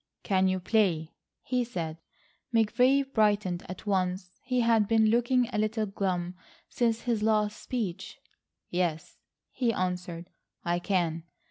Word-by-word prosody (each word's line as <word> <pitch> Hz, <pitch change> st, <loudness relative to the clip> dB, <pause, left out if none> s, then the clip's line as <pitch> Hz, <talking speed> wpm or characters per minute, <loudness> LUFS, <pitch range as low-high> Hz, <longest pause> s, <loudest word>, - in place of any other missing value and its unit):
"Can 190 Hz, -2 st, +2 dB
you 185 Hz, 0 st, +1 dB
play?" 180 Hz, -5 st, +1 dB, 0.3 s
he 250 Hz, -1 st, 0 dB
said. 165 Hz, -9 st, -5 dB, 0.5 s
McVay 245 Hz, +5 st, +4 dB
brightened 205 Hz, -5 st, +2 dB
at 185 Hz, -, -8 dB
once. 185 Hz, -2 st, -1 dB
He 250 Hz, -1 st, 0 dB
had 225 Hz, -3 st, +3 dB
been 220 Hz, -1 st, +4 dB
looking 240 Hz, +1 st, +3 dB
a 210 Hz, -, 0 dB
little 215 Hz, +1 st, 0 dB
glum 185 Hz, -3 st, -2 dB, 0.4 s
since 230 Hz, -2 st, 0 dB
his 235 Hz, -4 st, -1 dB
last 215 Hz, -1 st, +1 dB
speech. 190 Hz, -7 st, -4 dB, 0.5 s
"Yes," 175 Hz, -3 st, -2 dB, 0.3 s
he 245 Hz, -3 st, +1 dB
answered, 180 Hz, -2 st, -3 dB, 0.3 s
"I 175 Hz, 0 st, +1 dB
can. 170 Hz, -4 st, -1 dB
205 Hz, 130 wpm, -29 LUFS, 180-230 Hz, 0.5 s, McVay